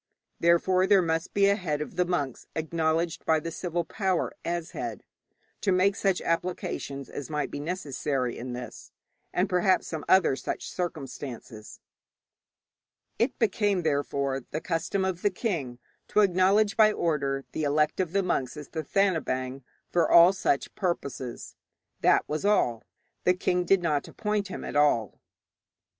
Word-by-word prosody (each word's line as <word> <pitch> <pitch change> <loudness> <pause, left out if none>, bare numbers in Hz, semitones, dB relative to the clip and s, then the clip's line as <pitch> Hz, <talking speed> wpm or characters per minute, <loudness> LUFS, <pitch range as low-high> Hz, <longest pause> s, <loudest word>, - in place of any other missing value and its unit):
Therefore 185 +2 +3
there 195 -2 +5
must 165 0 -1
be 200 -1 +3
a 200 - +4
head 160 -7 -2
of 150 - -6
the 180 - +2
monks 145 -8 -2
acknowledged 160 +1 -1
by 160 -1 +3
the 165 +2 -5
civil 175 0 -2
power 190 0 -1
as 170 -1 -3
head, 115 -4 -5 0.6
to 200 - +1
make 190 +2 +3
such 195 -3 +1
applications 165 -5 -3
as 145 - -7
might 150 -1 -2
be - - -5
necessary 145 -6 -2
in 125 +1 -6
this, 125 0 -8 0.4
and 180 +3 +1
perhaps 185 +1 +2
some 160 -3 -5
other 185 -7 +5
such - - -4
circumstances. 135 -9 -6 1.4
It 235 - +1
became, 205 -4 +1
therefore, 140 -3 -1
the 155 - -3
custom 170 +4 -1
for 190 - +2
the 205 - +3
king 170 - -3 0.3
to 210 - +3
acknowledge 200 +2 +3
by 215 -1 +6
order 140 -7 -1
the - - -3
elect 150 +3 +1
of 180 -3 0
the 195 +1 +1
monks 135 -7 -1
as 150 - -8
Thathanabaing 155 -6 -1 0.3
for 170 -2 +2
all 170 +2 +8
such 145 -7 0
purposes. 140 - -4 0.5
That - - +3
was 155 +3 -3
all. 125 - +2 0.4
The 180 - +4
king 180 0 0
did 195 0 +3
not 150 -4 0
appoint 210 -2 -2
him 190 - -7
at - - -6
all. 145 -8 +2
170 Hz, 150 wpm, -27 LUFS, 145-185 Hz, 1.4 s, all